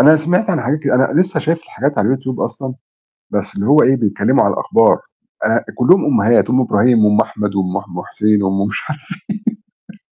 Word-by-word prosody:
أنا 155 +2 +7
سِمِعت 175 +7 0
عن 165 -5 -1
حاجات 135 +6 -1
كد 140 -2 -2
أنا 130 +6 +2
لسة 180 -4 -1
شايف 165 +1 -1
الحاجات 145 -3 -4
على 105 - +1
ال 130 - +2
YouTube 130 -1 -6
أصلًا، 130 -2 -4 0.6
بس - - -4
اللي 100 - -3
هو 150 +3 +5
إيه 135 - +3
بيتكلموا 110 -5 +1
على - - +1
الأخبار، - - +2 0.4
آآ، 115 +2 0
كُلُّهم 155 +10 +4
أمهات، 115 -5 +2
أم 130 +2 +2
إبراهيم 115 -1 +3
وأم 105 0 +3
أحمد 105 -1 -4
وأم 95 0 -1
ح 100 - -18
أم 90 0 -7
حسين، 105 -1 0
وأم 95 +1 0
مش 105 - -4
عارف 150 -1 -6 0.9
إيه 205 - -16
125 Hz, 210 wpm, -16 LUFS, 105-150 Hz, 0.9 s, أنا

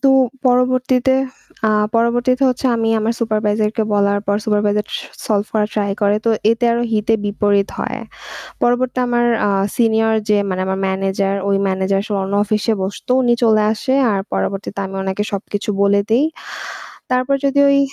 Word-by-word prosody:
তো 270 - +4 0.4
পরবর্তীতে 255 +1 +2 0.5
আ - - +4 0.3
পরবর্তীতে 245 +3 +1
হচ্ছে 255 +1 -1
আমি 225 -1 0
আমার 220 +1 0
সুপারভাইজার 215 -1 0
কে 225 - +1
বলার 200 0 +2
পর 200 +1 +1
সুপারভাইজার 210 -1 +1
স - - -5 0.3
সলভ 210 -1 0
করার 210 -1 +1
ট্রাই 205 -2 0
করে। 205 +1 +3
তো 230 - +3 0.2
এতে 230 +2 0
আরো 235 - 0
হিতে 215 +1 +1
বিপরীত 205 -1 +1
হয়। - - -3 0.6
পরবর্তীতে 250 +1 +1
আমার 240 0 +1 0.2
আ - - +2 0.3
সিনিয়র 225 -1 +2
যে 210 - +4
মানে 185 -1 -2
আমার 190 0 -2
ম্যানেজার 195 +1 -1
ওই 200 - +2
ম্যানেজার 190 +1 0
সে 215 - -5
অন্য 195 +1 -3
অফিসে 215 +2 0
বসতো। 195 +5 -6
উনি 240 -1 +3
চলে 220 -2 +4
আসে। 260 +4 -1 0.2
আর 195 - 0
পরবর্তীতে 195 0 -3
আমি 195 - -9
ওনাকে 190 +1 -2
সবকিছু 205 +1 -3
বলে 200 0 +3
দেই। 240 +6 +4 0.9
তারপর 255 +2 +1
যদি 280 0 +1
ওই 280 0 +4
215 Hz, 165 wpm, -18 LUFS, 200-240 Hz, 0.9 s, তো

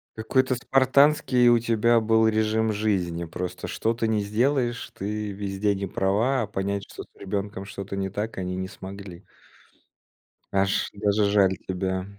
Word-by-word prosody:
Какой-то 130 +4 +1
спартанский 130 0 +3
у 120 0 +6
тебя 115 0 +2
был 110 0 +3
режим 110 0 +1
жизни. 90 -5 -1
Просто 90 +2 -5
что 115 +1 0
ты 115 -1 -1
ни 110 - +1
сделаешь, 120 +4 0
ты 105 +1 -4
везде 100 +1 -1
не 100 0 -4
права, 105 +9 +1
а 110 - -2
понять, 100 0 -2
что - - -8
с - - -21
ребенком 100 0 -4
что-то 100 0 -7
не 95 0 -2
так, 105 +3 -4
они 90 -1 -3
не 95 0 -3
смогли. 95 -1 -10 1.3
Аж, 95 0 +1
даже 105 +1 +1
жаль 100 -2 +3
тебя. 95 0 -2
105 Hz, 155 wpm, -25 LUFS, 95-115 Hz, 1.3 s, у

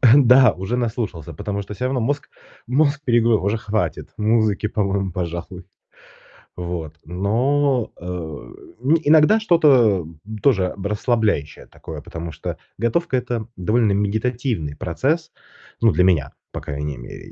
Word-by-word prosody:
Да, 125 -3 +7
уже 95 +6 -3
наслушался, 110 - -3
потому 100 +6 -4
что 100 +1 -8
всё 105 - -4
равно 130 -1 0
мозг 145 +5 -2 0.4
мозг 145 +3 +2
перегру 115 -2 +3
уже 100 +3 0
хватит 110 0 -2
музыки, 110 -1 +2
по-моему, 100 -3 -1
пожалуй. 85 +1 -5 0.9
Вот 85 -3 -5
но, 120 - +1
э 85 - -13 0.7
Ну 140 +7 +3
иногда 155 +8 +6
что-то, 140 - +4
м, 80 -1 -12 0.2
тоже 95 -10 +3
б 100 +1 -3
расслабляющее 105 - 0
такое, - - -9
потому 85 0 -7
что - - -5 0.2
готовка- 130 - 0
это 120 -3 -3
довольно 105 +3 +2
медитативный 110 - -1
процесс, 140 - -1 0.5
ну 115 -2 +5
для 90 +3 +3
меня, 80 -7 +2 0.2
по - - -6
крайней 70 0 -4
мере, - - -10
110 Hz, 135 wpm, -21 LUFS, 90-125 Hz, 0.9 s, Да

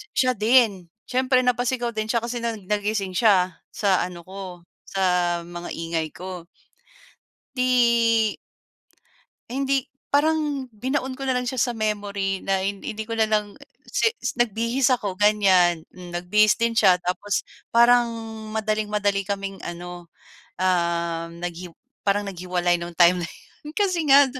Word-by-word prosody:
siya 255 -1 +3
din. 215 -5 +3 0.2
Siyempre 255 0 +2
napasigaw 245 0 0
din 215 0 -1
siya 235 - +2
kasi 240 +1 -3
nag 220 -5 -4
nagising 205 -2 -1
siya 185 -6 +3 0.2
sa 195 -3 +2
ano 175 -1 -8
ko, 185 -2 -8 0.2
sa 180 -2 +1
mga 175 0 -7
ingay 165 -1 -2
ko. 180 -2 -8 1.1
Di, 235 -3 +3 1.2
hindi, 270 0 0 0.3
parang 295 -3 +1
binaon 260 +4 -2
ko 270 - -5
na 260 - +2
lang 250 0 -2
siya 260 - -4
sa 245 0 +1
memory 205 -3 -2
na 195 -1 +1
hin 200 0 -3
hindi 220 0 -4
ko 230 - -2
na 220 - +5
lang 210 -1 0 0.3
si - - +2 0.3
nagbihis 235 +3 +1
ako 200 -6 -4
ganyan, 185 -5 +4
hmm, 180 -1 -11
nagbihis 210 +5 +3
din 230 0 +2
siya. 185 -4 +6
Tapos 185 +2 -1 0.3
parang 240 0 +6 0.5
madaling-madali 210 -2 0
kaming 195 -1 -3
ano, 175 0 -7 0.5
uhm 170 -2 0
naghi 175 0 -5 0.3
parang 205 0 +1
naghiwalay 180 -1 0
nung 170 0 -6
time 175 0 +5
na 165 - -5
yun, 300 +1 -14
kasi 370 -5 +2
nga 280 +1 +8
205 Hz, 140 wpm, -24 LUFS, 180-240 Hz, 1.2 s, nga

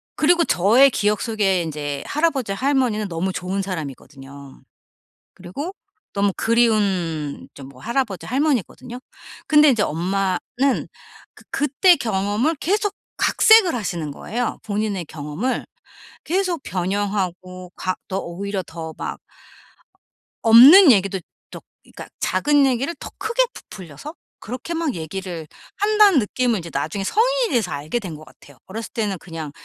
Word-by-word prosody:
그리고 340 +2 +3
저의 230 +10 +5
기억 210 -2 0
속에 205 -6 +1
인제 145 -3 -4
할아버지, 285 -9 0
할머니는 250 -4 0
너무 180 +3 -2
좋은 185 +2 -3
사람이거든요. 140 -5 -8 0.7
그리고 190 - -7 0.4
너무 200 -1 +1
그리운 195 -10 0
좀 135 -1 -11
뭐 130 -2 -16
할아버지, 235 -5 -2
할머니거든요. 255 - -2 0.5
근데 300 -1 +6
이제 225 -5 +2
엄마는 185 +4 -1 0.9
그 - - -18
그때 295 +6 +3
경험을 215 +8 -1
계속 410 +6 -1 0.2
각색을 440 - +5
하시는 175 -9 -3
거예요 230 +10 -4
본인의 205 -3 -2
경험을. 155 - -4 0.6
계속 355 -3 -1
변형하고 185 -1 -3
각 185 0 -3
더 190 0 -2
오히려 195 +3 -4
더 160 -1 -7
막 - - -5 1.2
없는 270 - +9
얘기도 195 -3 +1 0.3
더 - - -9 0.2
그러니까 - - -11
작은 290 -1 +2
얘기를 270 +6 0
더 - - -7
크게 470 +3 +1
부풀려서 190 - -10 0.3
그렇게 250 +8 -6
막 325 -6 -1
얘기를 170 0 -6 0.3
한다는 415 -5 +5
느낌은 235 0 0
이제 170 - -8
나중에 160 +8 -3
성인이 - - +1
돼서 210 -8 0
알게 150 +11 -3
된 180 -7 -7
것 155 - -12
같아요. 145 -3 -19
어렸을 220 +4 -7
때는 210 -5 -2
그냥 160 -4 -7
205 Hz, 305 characters per minute, -21 LUFS, 175-270 Hz, 1.2 s, 없는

